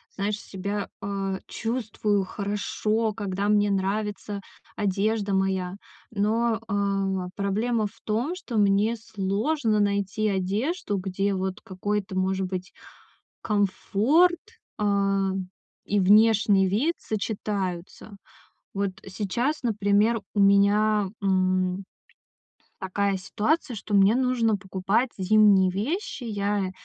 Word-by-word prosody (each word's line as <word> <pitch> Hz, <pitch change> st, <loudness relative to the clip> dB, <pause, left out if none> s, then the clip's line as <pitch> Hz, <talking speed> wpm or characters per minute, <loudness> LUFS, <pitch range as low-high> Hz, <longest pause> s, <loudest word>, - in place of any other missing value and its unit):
знаешь, 205 Hz, +1 st, -2 dB
себя, 200 Hz, +1 st, -4 dB
э, 195 Hz, -1 st, -3 dB
чувствую 215 Hz, -4 st, -1 dB
хорошо, 210 Hz, +2 st, -1 dB
когда 200 Hz, -1 st, -2 dB
мне 205 Hz, -1 st, +3 dB
нравится 200 Hz, +1 st, -2 dB, 0.3 s
одежда 205 Hz, +1 st, 0 dB
моя. 190 Hz, -1 st, 0 dB, 0.4 s
Но, 220 Hz, +2 st, +1 dB
э, 195 Hz, -2 st, -1 dB
проблема 215 Hz, +3 st, 0 dB
в -, -, -18 dB
том, 235 Hz, +11 st, -1 dB
что 250 Hz, -11 st, -5 dB
мне 205 Hz, +3 st, +3 dB
сложно 220 Hz, +3 st, -1 dB
найти 200 Hz, +1 st, 0 dB
одежду, 205 Hz, -, -1 dB
где 195 Hz, +1 st, -1 dB
вот 190 Hz, +1 st, -2 dB
какой-то 195 Hz, +1 st, -3 dB
может 190 Hz, 0 st, 0 dB
быть 185 Hz, 0 st, -5 dB, 0.7 s
комфорт, 215 Hz, -, +2 dB, 0.4 s
э, -, -, -1 dB, 1.0 s
и 205 Hz, -, +1 dB
внешний 205 Hz, 0 st, +5 dB
вид 255 Hz, -, +1 dB
сочетаются. 200 Hz, -2 st, -4 dB, 0.6 s
Вот 200 Hz, 0 st, 0 dB, 0.2 s
сейчас, 230 Hz, +10 st, -2 dB
например, 210 Hz, 0 st, +2 dB
у 205 Hz, -, +1 dB
меня, 200 Hz, +1 st, +4 dB
м, 185 Hz, 0 st, +1 dB, 1.0 s
такая 195 Hz, +1 st, 0 dB
ситуация, 240 Hz, -, -1 dB
что 205 Hz, +2 st, -7 dB
мне 195 Hz, +2 st, +5 dB
нужно 250 Hz, -4 st, +2 dB
покупать 195 Hz, +5 st, 0 dB
зимние 195 Hz, -1 st, +5 dB
вещи. 280 Hz, -, -3 dB
Я 205 Hz, -3 st, -1 dB
205 Hz, 105 wpm, -26 LUFS, 195-220 Hz, 1.0 s, внешний